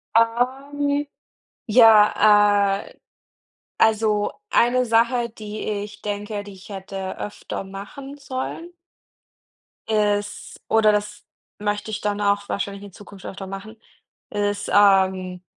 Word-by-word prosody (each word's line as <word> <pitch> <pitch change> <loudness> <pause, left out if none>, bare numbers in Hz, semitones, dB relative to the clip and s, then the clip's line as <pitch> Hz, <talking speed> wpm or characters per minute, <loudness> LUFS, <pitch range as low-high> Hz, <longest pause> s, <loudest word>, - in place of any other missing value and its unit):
Ähm, 275 +5 +1 0.6
ja, 210 -3 +5
äh, - - -15 0.8
also, 215 -1 +2 0.2
eine 250 +1 +3
Sache, 235 +1 +2
die 215 -1 -8
ich 205 0 -5
denke, 205 0 -4
die 205 -1 -11
ich 190 +2 -15
hätte 195 -1 -6
öfter 210 - -6
machen 205 +9 -9
sollen 270 +5 -6 1.2
ist 205 -1 -1
oder 220 -1 +5
das 210 0 -3 0.3
möchte 205 +1 -2
ich 210 - -3
dann 205 0 -1
auch 200 0 +1
wahrscheinlich 200 0 -4
in 200 -2 -11
Zukunft 200 -1 -13
öfter 195 0 -7
machen, 195 +3 -8 0.5
ist, 205 0 -2
ähm, 190 -2 +3
210 Hz, 110 wpm, -22 LUFS, 200-225 Hz, 1.2 s, ja